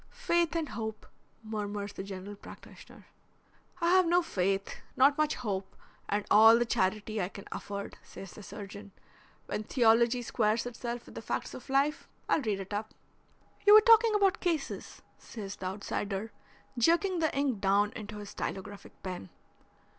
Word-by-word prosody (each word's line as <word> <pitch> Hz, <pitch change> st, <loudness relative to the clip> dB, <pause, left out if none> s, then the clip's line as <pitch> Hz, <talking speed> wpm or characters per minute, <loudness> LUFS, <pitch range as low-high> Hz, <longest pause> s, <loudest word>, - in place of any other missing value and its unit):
"Faith 345 Hz, -9 st, 0 dB
and 325 Hz, -3 st, -1 dB
hope," 220 Hz, -1 st, -5 dB, 0.4 s
murmurs 205 Hz, -2 st, -4 dB
the -, -, -6 dB
general 195 Hz, +1 st, -7 dB
practitioner. -, -, -14 dB, 0.7 s
"I 340 Hz, 0 st, +2 dB
have 370 Hz, -1 st, +5 dB
no 350 Hz, +1 st, +4 dB
faith, 195 Hz, -, -1 dB, 0.2 s
not 275 Hz, +2 st, +6 dB
much 305 Hz, 0 st, +1 dB
hope, 195 Hz, -6 st, -4 dB, 0.3 s
and 205 Hz, 0 st, 0 dB
all 225 Hz, +2 st, +8 dB
the 240 Hz, -, +1 dB
charity 215 Hz, -1 st, 0 dB
I 180 Hz, -, -2 dB
can 200 Hz, 0 st, -10 dB
afford," 200 Hz, 0 st, -6 dB
says 195 Hz, -2 st, -11 dB
the -, -, -11 dB
surgeon. 205 Hz, 0 st, -9 dB, 0.5 s
"When -, -, -3 dB
theology 235 Hz, +1 st, +3 dB
squares 225 Hz, 0 st, +1 dB
itself 240 Hz, 0 st, -5 dB
with -, -, -13 dB
the -, -, -7 dB
facts -, -, -3 dB
of -, -, -10 dB
life 280 Hz, +3 st, +1 dB, 0.2 s
I'll -, -, +2 dB
read 215 Hz, -6 st, -1 dB
it 195 Hz, +1 st, -7 dB
up." 215 Hz, +1 st, -4 dB, 0.7 s
"You 415 Hz, -, +10 dB
were 430 Hz, -, +10 dB
talking 455 Hz, -1 st, +6 dB
about 395 Hz, -3 st, +3 dB
cases," 330 Hz, -6 st, -3 dB, 0.2 s
says 205 Hz, -4 st, -8 dB
the 185 Hz, -, -4 dB
outsider, 200 Hz, +2 st, -3 dB, 0.5 s
jerking 340 Hz, -, +3 dB
the 315 Hz, -3 st, 0 dB
ink 270 Hz, -7 st, 0 dB
down 200 Hz, +1 st, +3 dB
into 215 Hz, -1 st, -8 dB
his 205 Hz, -1 st, -8 dB
stylographic 200 Hz, +1 st, -7 dB
pen. 180 Hz, -, -6 dB
220 Hz, 160 wpm, -30 LUFS, 200-285 Hz, 0.7 s, You